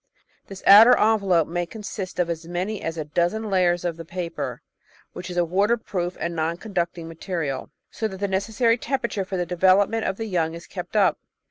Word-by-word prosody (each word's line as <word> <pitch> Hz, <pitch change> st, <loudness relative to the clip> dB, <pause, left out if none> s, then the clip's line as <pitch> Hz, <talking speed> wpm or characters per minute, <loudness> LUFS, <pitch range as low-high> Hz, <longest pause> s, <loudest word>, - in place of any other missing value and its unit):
This 195 Hz, -1 st, -10 dB
outer 220 Hz, +5 st, +9 dB
envelope 200 Hz, -7 st, +3 dB
may 175 Hz, +1 st, -2 dB
consist 200 Hz, -2 st, -7 dB
of 180 Hz, -1 st, +1 dB
as 165 Hz, -1 st, -5 dB
many 185 Hz, +5 st, -3 dB
as 165 Hz, 0 st, -4 dB
a 155 Hz, -, -3 dB
dozen 175 Hz, +8 st, -1 dB
layers 175 Hz, -2 st, +2 dB
of 170 Hz, -2 st, -2 dB
the 165 Hz, -, -7 dB
paper, 170 Hz, 0 st, -5 dB, 0.5 s
which 180 Hz, +1 st, -7 dB
is 180 Hz, -, -6 dB
a 175 Hz, -, +3 dB
water 200 Hz, +7 st, +2 dB
proof 180 Hz, -5 st, -4 dB
and 170 Hz, +1 st, -3 dB
non 165 Hz, +1 st, -1 dB
conducting 175 Hz, -5 st, -3 dB
material, 165 Hz, -4 st, -4 dB, 0.2 s
so 220 Hz, -, -2 dB
that 190 Hz, -3 st, -8 dB
the 200 Hz, -, 0 dB
necessary 225 Hz, +5 st, +1 dB
tempera 260 Hz, -3 st, -2 dB
ture 195 Hz, -2 st, -2 dB
for 190 Hz, 0 st, -4 dB
the 175 Hz, -, -1 dB
development 190 Hz, +5 st, +3 dB
of 190 Hz, 0 st, -2 dB
the 225 Hz, -, -4 dB
young 165 Hz, -5 st, -1 dB
is 170 Hz, -, -10 dB
kept 180 Hz, +1 st, -8 dB
up. 205 Hz, -2 st, +3 dB
185 Hz, 205 wpm, -24 LUFS, 170-205 Hz, 0.5 s, outer